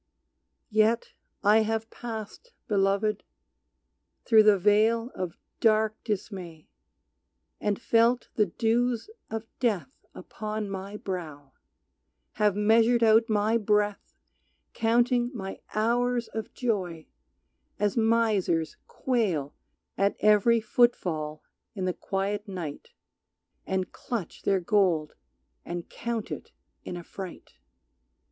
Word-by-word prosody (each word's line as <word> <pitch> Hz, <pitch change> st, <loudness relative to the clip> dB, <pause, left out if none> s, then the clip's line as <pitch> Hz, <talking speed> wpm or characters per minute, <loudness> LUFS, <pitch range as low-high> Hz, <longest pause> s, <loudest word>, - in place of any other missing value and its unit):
Yet 220 Hz, +2 st, +2 dB, 0.3 s
have 220 Hz, +2 st, +4 dB
I -, -, -43 dB
passed, 230 Hz, -, -7 dB
Beloved, 200 Hz, +1 st, +1 dB, 1.0 s
through 220 Hz, -2 st, +7 dB
the 210 Hz, -1 st, +6 dB
vale 220 Hz, +5 st, +3 dB
Of 180 Hz, -3 st, -5 dB, 0.2 s
dark 215 Hz, -1 st, +3 dB
dismay, 190 Hz, -7 st, -5 dB, 0.9 s
and 205 Hz, -1 st, -1 dB
felt 235 Hz, +2 st, +2 dB
the 210 Hz, -2 st, +2 dB
dews 235 Hz, -, 0 dB, 0.2 s
of 225 Hz, 0 st, -4 dB
death 235 Hz, -1 st, 0 dB, 0.2 s
Upon 215 Hz, -1 st, -5 dB
my 195 Hz, +2 st, -5 dB
brow, 155 Hz, -9 st, -6 dB, 0.9 s
have 210 Hz, -2 st, +4 dB
measured 225 Hz, +3 st, +4 dB
out 225 Hz, +1 st, +5 dB
my 215 Hz, +2 st, +2 dB
breath 210 Hz, -1 st, 0 dB, 0.6 s
Counting 240 Hz, +1 st, +2 dB
my 195 Hz, -3 st, -6 dB, 0.2 s
hours 240 Hz, +2 st, +1 dB
of 220 Hz, -1 st, -5 dB
joy, 185 Hz, -10 st, -2 dB, 0.7 s
as 205 Hz, -1 st, 0 dB
misers 220 Hz, -8 st, +1 dB
quail 195 Hz, -, -1 dB, 0.5 s
At 200 Hz, +1 st, +2 dB
every 215 Hz, +2 st, +5 dB
footfall 175 Hz, -10 st, +1 dB, 0.3 s
in 190 Hz, -2 st, -2 dB
the 185 Hz, -, 0 dB
quiet 200 Hz, +3 st, -3 dB
night 175 Hz, -7 st, -6 dB, 0.8 s
And 190 Hz, -1 st, -1 dB
clutch 225 Hz, -9 st, -5 dB
their 195 Hz, -2 st, +1 dB
gold 175 Hz, -5 st, +2 dB, 0.5 s
and 175 Hz, 0 st, -5 dB
count 235 Hz, -2 st, -4 dB
it -, -, -7 dB, 0.3 s
in 175 Hz, -, -6 dB
affright. 180 Hz, +1 st, -9 dB
210 Hz, 105 wpm, -27 LUFS, 190-230 Hz, 1.0 s, through